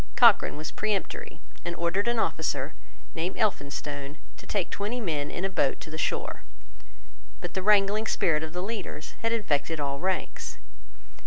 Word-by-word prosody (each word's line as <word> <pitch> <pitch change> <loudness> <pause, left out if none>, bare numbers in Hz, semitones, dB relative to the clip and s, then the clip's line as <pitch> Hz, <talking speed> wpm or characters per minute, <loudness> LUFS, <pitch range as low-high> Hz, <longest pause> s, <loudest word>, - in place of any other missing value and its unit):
Cochrane - - +6
was 155 +1 -4
peremptory, 210 -3 -2 0.2
and 175 0 -3
ordered 175 +5 +1
an 235 0 +2
officer, - - 0 0.4
named 170 +3 -2
Elphinstone, 145 -6 -1 0.2
to - - -12
take 200 -4 0
twenty 210 +5 -1
men 155 -9 -1
in 180 - -2
a - - +4
boat 145 -8 +1
to 160 - -8
the 155 - -4
shore. - - -1 1.0
But - - -5
the 190 - -1
wrangling 210 +2 +4
spirit 155 -7 +3
of 160 0 -4
the 180 +2 -3
leaders 200 -7 -4
had 230 - +1
infected 160 -8 +1
all 140 -1 -1
ranks. 185 +1 -2
180 Hz, 160 wpm, -28 LUFS, 150-205 Hz, 1.0 s, Cochrane